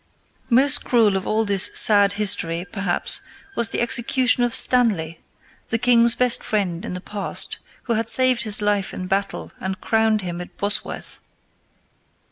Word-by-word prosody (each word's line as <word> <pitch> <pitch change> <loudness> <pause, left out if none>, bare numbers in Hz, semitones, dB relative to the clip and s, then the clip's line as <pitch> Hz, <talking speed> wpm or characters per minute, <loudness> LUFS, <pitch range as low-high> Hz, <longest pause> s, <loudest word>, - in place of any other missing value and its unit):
Most 280 +4 +2
cruel 225 -5 +1
of 190 - -4
all 220 +1 -1
this 200 -2 +2
sad 205 -2 +4
history, 180 -4 +1
perhaps, 195 -4 0 0.3
was 235 -1 +2
the - - -3
execution 250 +1 0
of 240 -1 0
Stanley, 195 -11 +3 0.5
the 225 - -2
king's 235 0 +3
best 250 -1 +1
friend 190 -5 -3
in - - -7
the 180 - -8
past, 200 0 -1 0.2
who 235 - -3
had 225 0 -3
saved 255 -2 +3
his 215 -2 +1
life 205 -2 -2
in 185 - -7
battle 195 +1 -4
and 190 0 -6
crowned 220 -2 -1
him 175 -1 -6
at 180 - -13
Bosworth. 205 +1 -1
210 Hz, 155 wpm, -20 LUFS, 195-235 Hz, 0.5 s, sad